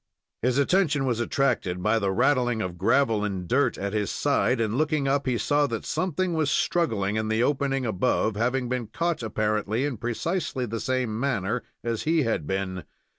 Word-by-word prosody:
His 125 +2 +1
attention 150 -2 +2
was 120 -3 0
attracted 105 -8 0
by 110 +2 +3
the 100 -2 0
rattling 120 +1 +2
of 90 -4 -4
gravel 115 +1 +2
and 95 -4 -3
dirt 140 +7 +2
at 100 +1 -3
his 105 -2 0
side, 135 -3 +1
and 110 -1 0
looking 155 -1 +1
up, 140 0 +1
he 125 -2 +1
saw 145 +4 +2
that 115 -3 -4
something 185 0 -1
was 155 -3 +1
struggling 110 - +1
in 110 0 -1
the 110 +2 +1
opening 135 -1 0
above, 110 0 +1
having 125 +3 0
been 125 -2 -2
caught 165 +8 -1
apparently 110 +2 -1
in 140 -5 -3
precisely 130 - -2
the 115 0 -4
same 125 -4 -1
manner 120 -4 -1 0.2
as 115 -2 -2
he 160 -1 +2
had 110 - -1
been. 95 -2 -2
120 Hz, 180 wpm, -26 LUFS, 105-140 Hz, 0.2 s, by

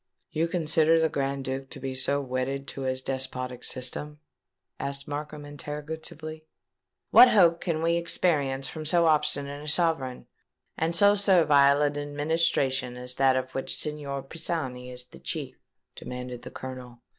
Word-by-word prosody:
"You 160 +2 +1
consider 165 -1 +3
the 160 0 +2
Grand 140 -2 -2
Duke 135 0 -4
to - - -9
be 135 0 -4
so 140 +2 0
wedded 135 +1 -2
to 135 - -5
his 130 0 -1
despotic 130 -2 -3
system?" 145 +4 -3 0.6
said 140 0 0
Markham 150 0 -5
interrogatively. 155 +2 -7 0.6
"What 255 - +10
hope 170 -6 +5
can 165 -3 -1
we 170 +1 +3
experience 145 -6 +1
from 155 - -6
so 170 +2 +3
obstinate 145 -2 +1
a - - -9
sovereign, 150 -5 0 0.5
and 165 +1 -1
so 205 +3 +6
servile 150 -8 +5
an 145 0 0
administration 145 -4 0
as 125 0 -4
that 135 -1 +4
of 130 0 -2
which 135 - -3
Signor 145 -3 -3
Pisani 135 -5 -4
is 125 0 -6
the - - -15
chief?" - - -5 0.4
demanded 125 -1 -7
the - - -8
Colonel. 125 -2 -8
145 Hz, 150 wpm, -27 LUFS, 130-160 Hz, 0.6 s, What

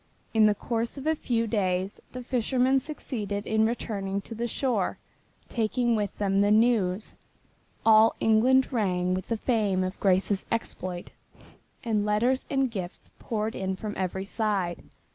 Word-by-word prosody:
In 220 -1 +6
the 210 - +3
course 230 +4 -2
of 275 - -7
a 315 - +3
few 235 -6 -1
days 190 -3 -1
the 250 0 -7
fishermen 255 +2 +2
succeeded 215 -8 -4
in 220 0 +2
returning 200 -4 -3
to 225 - -8
the 235 +2 -2
shore, 255 +2 -1 0.5
taking 235 +1 0
with 205 -2 -2
them 195 -1 +2
the 205 - +3
news. 215 -3 +2 0.7
All 220 0 +6
England 255 +5 +3
rang 185 -5 +1
with 185 0 -3
the 230 - -1
fame 210 -6 +1
of 185 +1 -4
Grace's 195 +1 +2
exploit, 185 -6 -3 0.7
and 215 -3 +1
letters 230 +5 +1
and 270 -3 +1
gifts 185 -5 -6
poured 220 0 -2
in 190 0 -2
from 210 +2 -5
every 190 +1 -2
side. 200 -5 -1
215 Hz, 150 wpm, -27 LUFS, 195-235 Hz, 0.7 s, In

